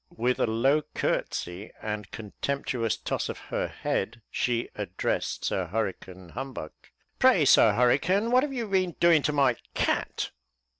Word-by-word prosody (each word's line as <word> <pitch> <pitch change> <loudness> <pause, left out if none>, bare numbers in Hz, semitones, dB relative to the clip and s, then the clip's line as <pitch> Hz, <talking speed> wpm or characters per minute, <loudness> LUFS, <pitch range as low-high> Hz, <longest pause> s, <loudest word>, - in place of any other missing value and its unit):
With 125 +2 +1
a - - +2
low 135 +7 +3
courtesy 90 +5 -2
and 105 -2 -4
contemptuous 115 +1 -2
toss - - -3
of - - -4 0.2
her - - 0
head, 115 +4 -3
she 120 -1 0
addressed 100 -4 -2
Sir 95 -2 -1
Hurricane 95 -2 -4
Humbug. 130 - -6 0.5
"Pray, - - +5
Sir 110 - +6
Hurricane, 165 - +2
what 250 +1 +6
have 290 0 -2
you 240 -4 -3
been 185 -3 +1
doing 170 -3 +5
to 150 - +1
my 135 -5 +3 0.2
cat?" - - -1
120 Hz, 145 wpm, -27 LUFS, 105-150 Hz, 0.5 s, Sir